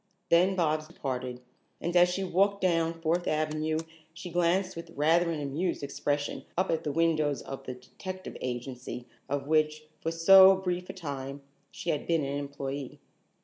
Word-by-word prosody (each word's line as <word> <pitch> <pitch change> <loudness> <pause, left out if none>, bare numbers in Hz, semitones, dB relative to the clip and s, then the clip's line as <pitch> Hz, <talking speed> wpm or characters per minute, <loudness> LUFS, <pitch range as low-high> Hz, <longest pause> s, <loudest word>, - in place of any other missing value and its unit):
Then 180 +3 +4
Bobs 155 -3 +1
departed, 130 -5 -4 0.4
and 175 +1 -3
as 175 0 +6
she 190 +2 -2
walked 195 +2 +2
down 165 -3 +1
Fourth 170 +2 0
Avenue 155 0 0 0.4
she 175 0 -7
glanced 175 +2 +1
with 165 0 -8
rather 165 +4 +3
an 165 -2 -2
amused 145 +4 -2
expression 145 +1 -2
up 185 +1 +1
at 165 - 0
the 150 - -1
windows 155 -2 +1
of 135 - -7
the 130 - -5
Detective 185 +9 -8
Agency 125 0 -5 0.2
of 140 0 -1
which, 155 0 +2 0.2
for 165 - -2
so 190 +4 +8
brief 180 -1 -3
a - - -4
time, 140 -5 -6 0.3
she 170 - -3
had 150 - -3
been 165 -3 +2
an 140 +1 -2
employee. 140 -1 -5
160 Hz, 165 wpm, -29 LUFS, 140-175 Hz, 0.4 s, so